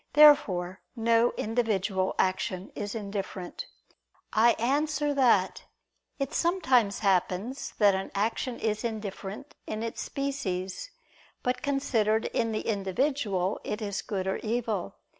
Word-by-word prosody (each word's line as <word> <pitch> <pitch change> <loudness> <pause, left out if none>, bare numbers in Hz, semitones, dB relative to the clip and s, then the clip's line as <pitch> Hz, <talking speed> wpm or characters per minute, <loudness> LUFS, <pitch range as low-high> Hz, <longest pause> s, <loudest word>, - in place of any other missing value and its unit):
Therefore 205 -12 +5
no 230 0 +3
individual 210 -4 0
action 185 0 -1
is 205 +1 -4
indifferent. 200 -3 -5 0.7
I 230 +2 +5
answer 290 +4 0
that, 235 -9 +3 0.5
It 275 -1 -3
sometimes 260 - +2
happens 195 +7 0
that 205 -2 +5
an 190 0 -2
action 230 +4 -1
is 215 0 -1
indifferent 215 +2 -5
in 215 +1 -3
its 230 - -4
species, 260 - -3 0.5
but 250 0 0
considered 240 -7 +1
in 230 -1 +1
the 215 - -1
individual 205 -1 0
it 210 - -3
is 200 -3 -3
good 190 -3 -3
or 190 - 0
evil. 220 - -2
220 Hz, 120 wpm, -28 LUFS, 195-255 Hz, 0.7 s, Therefore